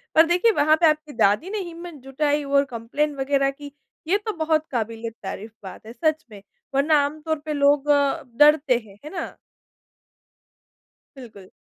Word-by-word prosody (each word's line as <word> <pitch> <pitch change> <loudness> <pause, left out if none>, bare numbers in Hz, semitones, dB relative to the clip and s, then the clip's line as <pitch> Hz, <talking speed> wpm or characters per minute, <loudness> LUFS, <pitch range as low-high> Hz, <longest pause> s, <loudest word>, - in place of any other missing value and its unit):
पर 320 +1 +7
देखिए, 360 +7 +3
वहाँ 310 -3 +3
पे 330 - +6
आपकी 305 -1 -2
दादी 210 - +2
ने 425 0 -3
हिम्मत 345 -1 -8
जुटाई 290 +2 -1
और 280 0 +2
कंप्लेंट 270 +5 -3
वगैरह 275 0 +1
की, 285 0 -11 0.4
ये 395 +4 +3
तो 435 - -2
बहुत 315 0 +1
काबिलियत 230 -1 -4
तारीफ़ 210 +3 -6
बात 190 +3 -10
है, 230 - -10
सच 315 +1 -1
में। 200 -1 -11 0.3
वरना 295 +2 +3
आम 300 +2 -6
तौर 315 -1 -1
पे 305 - -2
लोग 285 0 +2
अ, 285 -1 +2
डरते 295 -4 +5
हैं, 195 - -16
है - - -6
ना? 345 -3 -6 1.8
बिल्कुल। 215 -7 -13
290 Hz, 170 wpm, -23 LUFS, 255-315 Hz, 1.8 s, पर